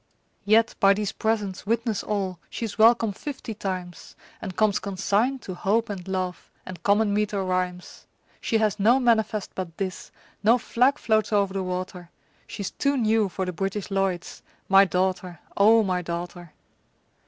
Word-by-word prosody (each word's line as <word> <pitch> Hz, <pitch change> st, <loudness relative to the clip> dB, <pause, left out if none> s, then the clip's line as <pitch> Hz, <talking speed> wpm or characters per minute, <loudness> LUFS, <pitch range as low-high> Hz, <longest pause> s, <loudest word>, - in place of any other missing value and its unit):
Yet 220 Hz, +2 st, +4 dB
by 195 Hz, 0 st, +5 dB
these 210 Hz, -1 st, -2 dB
presents 210 Hz, -3 st, -2 dB
witness 230 Hz, -1 st, 0 dB
all 190 Hz, -4 st, -3 dB
She's 225 Hz, -3 st, -5 dB
welcome 225 Hz, -1 st, +5 dB
fifty 260 Hz, 0 st, -6 dB
times, 185 Hz, -4 st, -6 dB, 0.3 s
And 185 Hz, -, -6 dB
comes 215 Hz, -1 st, +2 dB
consigned 205 Hz, +6 st, -1 dB
to 185 Hz, -, -6 dB
Hope 210 Hz, +5 st, 0 dB
and 190 Hz, -2 st, -7 dB
Love 185 Hz, -2 st, -3 dB, 0.2 s
And 180 Hz, -3 st, -9 dB
common 205 Hz, +1 st, +2 dB
meter 205 Hz, -1 st, 0 dB
rhymes. 180 Hz, -1 st, -3 dB, 0.3 s
She 225 Hz, -, +1 dB
has 215 Hz, -1 st, 0 dB
no 235 Hz, +6 st, +4 dB
manifest 220 Hz, -4 st, +1 dB
but 175 Hz, -3 st, -6 dB
this, 190 Hz, -3 st, -4 dB, 0.3 s
No 230 Hz, +4 st, +5 dB
flag 250 Hz, +4 st, +2 dB
floats 220 Hz, -4 st, +1 dB
o'er 205 Hz, -1 st, +3 dB
the 195 Hz, 0 st, -4 dB
water, 180 Hz, -1 st, -5 dB, 0.4 s
She's 200 Hz, -, -5 dB
too 280 Hz, 0 st, 0 dB
new 220 Hz, -3 st, +2 dB
for 190 Hz, +1 st, -3 dB
the 180 Hz, -, -4 dB
British 195 Hz, +4 st, -3 dB
Lloyds 195 Hz, -3 st, -2 dB, 0.3 s
My 195 Hz, +1 st, +7 dB
daughter, 185 Hz, -2 st, -1 dB, 0.2 s
O 220 Hz, +3 st, +5 dB
my 185 Hz, -2 st, -1 dB
daughter! 175 Hz, 0 st, -6 dB
200 Hz, 155 wpm, -25 LUFS, 185-220 Hz, 0.4 s, My